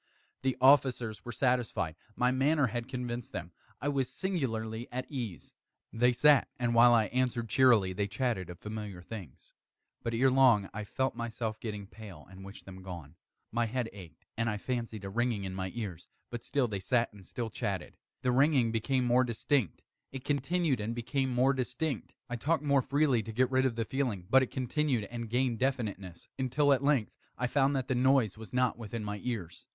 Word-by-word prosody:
The 130 -1 0
officers 130 -4 +4
were 120 - -6
satisfied. 115 - 0 0.2
My 125 +1 +2
manner 140 +3 +3
had 120 0 -3
convinced 125 -2 -5
them. 90 -1 -5 0.3
I - - -3
was 135 -3 0
singularly 120 - -2
at 130 +1 -3
ease. 120 -10 -5 0.4
They 125 +2 +4
sat, 145 +3 +5
and 120 -2 0
while 120 +1 +7
I 110 -2 +4
answered 125 -3 0
cheerily, 110 -6 +4
they 100 +2 -1
chatted 105 -5 -1
of 90 - -8
familiar 105 -2 -6
things. 95 - -10 0.5
But, 115 0 -2
ere 130 +3 +4
long, 125 -7 +5
I 105 0 -5
felt 130 +5 -1
myself 115 -2 -4
getting 105 -3 -5
pale 100 -6 -11
and 95 0 -11
wished 100 +1 -11
them 95 -1 -10
gone. 85 -5 -8 0.4
My 120 +1 +1
head 120 0 -2
ached, 95 -5 -13
and 115 0 0
I 105 - -1
fancied 115 -3 -4
a - - -4
ringing 120 -1 0
in 95 -1 -4
my 95 0 -3
ears: 100 -8 -6 0.2
but 120 -1 -5
still 140 -4 +1
they 100 -3 -3
sat 115 +4 +1
and 100 -2 -14
still 115 +4 -5
chatted. 100 -5 -3 0.3
The 125 - +2
ringing 130 -2 +4
became 125 +3 0
more 125 +1 +4
distinct: 120 - 0 0.3
It 135 0 -7
continued 145 0 +1
and 110 +3 -3
became 130 +3 -1
more 130 +2 +3
distinct: 130 +1 -3
I 120 - -4
talked 155 +5 0
more 140 -2 +3
freely 140 -2 +2
to 110 - -7
get 125 +3 +1
rid 130 0 +3
of 120 - -3
the 115 -1 -1
feeling: 120 -10 -2
but 135 - +7
it 130 - -1
continued 130 -1 0
and 120 -2 -5
gained 125 -1 +1
definiteness 105 -9 -2
until, 140 +2 +3
at 135 - +1
length, 140 -6 +2 0.3
I 125 - 0
found 140 +2 +2
that 130 -2 -1
the - - +1
noise 130 -4 +3
was 110 0 -10
not 125 -2 +1
within 115 0 -5
my 105 0 -4
ears. 105 -9 -5
120 Hz, 195 wpm, -31 LUFS, 105-130 Hz, 0.5 s, while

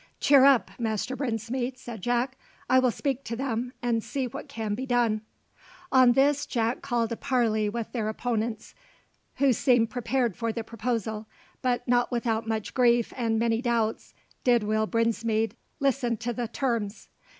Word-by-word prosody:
"Cheer 275 -2 +6
up, 275 -4 +5
Master 225 +2 -1
Brinsmead!" 245 0 -2
said 235 -5 -8
Jack. 245 +4 0 0.3
"I 260 +1 +5
will 255 -1 +3
speak 275 +2 -2
to 230 - -3
them, 245 -1 -2
and 230 -2 +1
see 275 -2 -2
what 245 - -7
can 220 -2 -3
be 260 +5 -4
done." 235 -3 +2 0.7
On 255 -2 +6
this 285 +2 +3
Jack 230 0 -1
called 240 -4 -1
a - - -1
parley 225 -5 +1
with 230 +1 -4
their 220 -4 -1
opponents, 225 -1 -3 0.6
who 270 -1 +3
seemed 240 -1 +3
prepared 245 -3 0
for 230 -1 -2
the 230 0 -4
proposal; 220 -1 -3 0.3
but 250 -1 0
not 245 0 +2
without 230 -2 -1
much 220 -2 -2
grief 240 -2 +3
and 230 -3 0
many 230 0 +1
doubts 230 -3 -1 0.3
did 240 -3 +4
Will 215 +1 +1
Brinsmead 230 -1 0 0.2
listen 265 -4 +1
to 240 +2 -3
the 240 0 -3
terms. 230 -4 -2
235 Hz, 160 wpm, -27 LUFS, 225-250 Hz, 0.7 s, Cheer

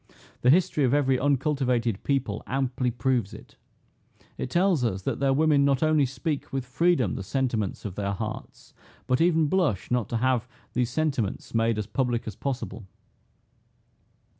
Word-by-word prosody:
The 125 - +4
history 170 -1 +3
of 130 +1 +3
every 135 -3 +2
uncultivated 130 -6 0
people 130 -7 -1
amply 130 -1 -1
proves 120 -3 -1
it. - - -14 0.8
It - - -4
tells 175 -3 +2
us, 95 -5 -1
that - - -2
their 135 0 +2
women 145 0 +3
not 140 0 +2
only 155 -3 +3
speak 145 +3 -4
with 135 -2 -2
freedom 130 - +2
the - - -4
sentiments 110 -1 -2
of 100 - -4
their 100 +1 -2
hearts, 110 +2 -7 0.3
but 130 +2 +1
even 165 -2 +4
blush 145 - 0
not 120 -3 0
to 115 - -1
have 125 0 +1 0.3
these 125 -1 0
sentiments 135 -7 -2
made 115 -1 +2
as 105 - -2
public 120 +2 -1
as 105 - -5
possible." 120 -6 -4
130 Hz, 160 wpm, -26 LUFS, 115-145 Hz, 0.8 s, The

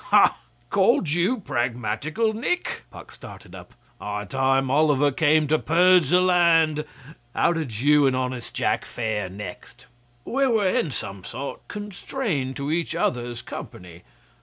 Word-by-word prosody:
'Ha! - - +5 0.4
Called 195 -3 +3
you 185 +9 +1
pragmatical, 125 - -1
Nick?' 305 +11 -2
Puck - - -12
started - - -12
up. - - -12 0.2
'High 105 0 -4
time 135 +2 +1
Oliver 145 -1 +3
came 155 +2 +3
to 155 0 +3
purge 180 +1 +4
the 180 - +5
land! 165 -4 +3 0.5
How - - +3
did 130 -10 -4
you 145 0 +5
and 130 - +1
honest 125 -1 -4
Jack - - 0
fare 110 -5 -3
next?' 105 +6 -10 0.4
'We 270 +2 +1
were 220 -5 +2
in 170 - 0
some 100 -7 -6
sort 135 +8 -7
constrained 205 - -4
to 140 +1 -3
each 165 +1 -1
other's 120 -1 -2
company. 90 -1 -9
145 Hz, 140 wpm, -24 LUFS, 125-175 Hz, 0.5 s, Ha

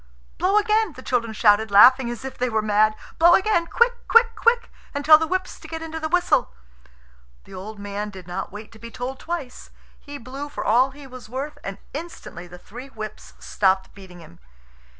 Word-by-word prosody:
"Blow 385 +3 +2
again!" 425 -3 +2
the 260 - -12
children 230 -3 -1
shouted, 215 0 +3
laughing 245 +5 +6
as 240 +2 -7
if 265 - -6
they 250 0 -1
were 220 -2 0
mad. 215 +1 +2 0.2
"Blow 345 +1 +7
again 380 -4 +1
quick, 480 +5 +2
quick, 465 0 +5
quick! 470 0 +1 0.2
and 285 0 -3
tell 310 0 +8
the 320 - -1
whips 370 +2 -3
to - - -12
get 325 0 -6
into 320 0 -6
the 315 0 -3
whistle." 355 - +2 0.9
The - - -15
old 205 +3 -8
man 205 +1 -5
did 190 -3 -11
not 175 0 -5
wait 210 +2 -10
to 225 - -16
be 235 - -9
told 255 +2 -6
twice. 325 -7 -6 0.3
He 290 0 -9
blew 275 +3 -8
for - - -6
all 250 +4 +4
he 280 +1 -13
was 255 -3 -12
worth, 275 +5 -5
and 195 0 -6 0.2
instantly 295 - -8
the 175 +1 -12
three 245 +8 -11
whips 215 -5 -9
stopped 190 -1 0
beating 185 -3 -13
him. 85 - -16
255 Hz, 200 wpm, -23 LUFS, 210-320 Hz, 0.9 s, tell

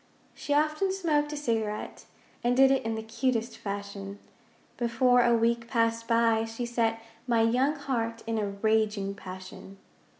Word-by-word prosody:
She - - -7
often 305 +6 +2
smoked 305 -6 0
a 300 - -4
cigarette, 225 -6 -3 0.4
And 245 +1 +2
did 270 0 +7
it 270 - +2
in 225 0 -2
the 220 - -4
cutest 230 +1 -1
fashion. 200 0 -6 0.6
Before 245 +1 +3
a 240 0 +4
week 230 0 +1
passed 230 -1 0
by 230 -1 +3
she 225 +2 -5
set 230 -1 0 0.3
My 230 -2 +3
young 255 +6 +2
heart 230 -5 -3
in 225 -1 -1
a 205 -1 -1
raging 210 -1 0
passion. 185 0 -10
230 Hz, 155 wpm, -28 LUFS, 220-250 Hz, 0.6 s, did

